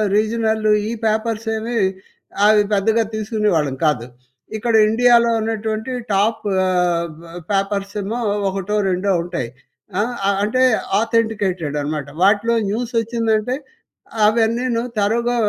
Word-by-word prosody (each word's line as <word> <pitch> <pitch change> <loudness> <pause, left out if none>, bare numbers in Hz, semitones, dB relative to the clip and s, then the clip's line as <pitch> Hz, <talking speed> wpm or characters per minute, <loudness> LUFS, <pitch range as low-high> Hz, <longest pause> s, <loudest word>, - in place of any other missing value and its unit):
Regional 220 0 0 0.2
ఈ - - -3
papers 220 +1 -1
ఏమి 230 +2 -4 0.7
అవి 210 0 +5
పెద్దగా 220 +3 +2
తీసుకునేవాళ్ళం 210 - 0
కాదు. 145 -7 +1 0.5
ఇక్కడ 230 +1 0
ఇండియాలో 235 +1 +4
ఉన్నటువంటి 220 +1 -3 0.2
టాపు 210 +2 +1 0.2
ఆహ్, 175 -2 0 0.4
పేపర్సేమో 200 +2 -2 0.3
ఒకటో 195 +2 -3
రెండో 185 +2 0
ఉంటాయి. 170 -9 -4 0.5
ఆహ్, 240 +4 -1 0.3
అంటే 255 +5 +1 0.4
ఆథెంటికేటెడ్ 210 -9 0
అనమాట. 145 -1 -3
వాటిలో 205 +4 +3
న్యూస్ 235 +4 -3
వచ్చిందంటే 230 +1 0 0.7
అవన్నీను 230 +2 +1 0.2
థరోగా 235 +4 +1
215 Hz, 100 wpm, -19 LUFS, 195-230 Hz, 0.7 s, అవి